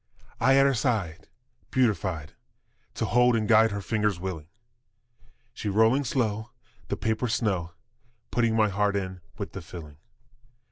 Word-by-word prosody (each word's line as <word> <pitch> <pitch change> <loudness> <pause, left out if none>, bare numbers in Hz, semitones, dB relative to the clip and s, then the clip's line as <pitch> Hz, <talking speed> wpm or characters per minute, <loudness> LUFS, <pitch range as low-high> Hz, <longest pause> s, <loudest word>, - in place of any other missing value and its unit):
I 135 +1 +4
at 135 0 +6
her 140 - +3
side 105 -9 -1 0.4
beatified, 95 - 0 0.6
To - - -1
hold 125 +4 +4
and 110 -2 0
guide 110 0 +6
her 100 -1 -4
fingers 105 -4 0
willing; 85 -4 -5 1.1
She 105 - -4
rolling 110 +7 +3
slow 110 -3 -1 0.4
the - - -2
paper's 110 +1 0
snow, 90 -6 -1 0.6
Putting 115 -2 +2
my 110 -1 +3
heart 100 +1 +1
in 95 -2 -3 0.2
with - - -5
the - - -7
filling. 75 -4 -10
105 Hz, 140 wpm, -27 LUFS, 95-115 Hz, 1.1 s, at